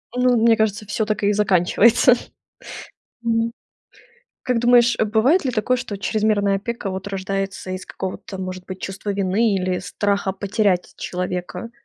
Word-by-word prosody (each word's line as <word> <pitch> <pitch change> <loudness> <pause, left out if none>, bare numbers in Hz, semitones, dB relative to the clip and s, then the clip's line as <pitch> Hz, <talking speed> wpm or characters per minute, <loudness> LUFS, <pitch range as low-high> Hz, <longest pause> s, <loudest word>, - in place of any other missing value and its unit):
Ну, 250 -1 +3
мне 225 0 +4
кажется, 215 -1 0
всё 215 +2 -1
так 210 -1 -2
и 205 - +3
заканчивается. 210 +5 +4 1.1
Мгм. 230 0 0 0.9
Как 250 -2 0
думаешь, 240 0 +5
э, - - +3
бывает 235 - +3
ли 260 - +1
такое, 250 +2 +1
что 230 -5 -5
чрезмерная 210 -1 +1
опека 220 0 -4
вот 190 +1 -5
рождается 195 -1 -4
из 185 0 -5
какого-то, 190 +1 -6
может 185 -1 -6
быть, 185 0 -8
чувства 195 +2 -4
вины 200 +2 +1
или 185 -1 -1
страха 200 +1 -1
потерять 200 -2 0
человека? 180 +4 -4
205 Hz, 145 wpm, -21 LUFS, 190-230 Hz, 1.1 s, думаешь